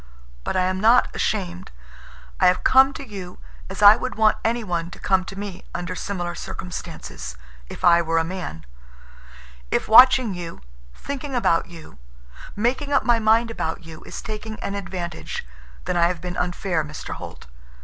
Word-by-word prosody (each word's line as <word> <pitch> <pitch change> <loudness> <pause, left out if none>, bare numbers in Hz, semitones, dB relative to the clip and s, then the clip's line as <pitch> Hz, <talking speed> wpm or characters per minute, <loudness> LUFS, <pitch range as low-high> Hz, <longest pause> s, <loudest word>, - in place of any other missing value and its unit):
But - - -3
I 185 - +3
am 185 +1 -1
not 230 +3 +4
ashamed. 185 -4 -2 0.7
I - - +5
have 180 - +2
come 265 +1 +6
to 275 - -8
you 190 -4 -8 0.3
as 195 +2 -4
I 205 +1 +10
would 255 - -4
want 215 -1 +4
anyone 200 -8 -1
to - - -11
come 190 -2 +1
to 195 - -9
me 200 -2 -6
under 175 0 -3
similar 175 -1 -4
circumstances, - - -7 0.3
if - - -9
I 170 -1 +6
were 165 0 0
a 165 - +3
man. 165 - -6 1.0
If - - 0
watching 250 -1 +7
you, 175 - -7 0.3
thinking 280 -1 -5
about 170 -9 +2
you, 165 - -13 0.6
making 255 +7 0
up 280 - +3
my 240 -1 +3
mind 225 +1 +3
about 165 -5 -4
you 160 -1 -11
is - - -8
taking 215 0 -6
an 200 - -3
advantage—then 65 - -6
I 170 -1 +4
have 175 -1 -3
been 180 +1 -6
unfair, 175 -2 -1
Mr. 150 0 -7
Holt. - - -9
185 Hz, 165 wpm, -23 LUFS, 170-220 Hz, 1.0 s, I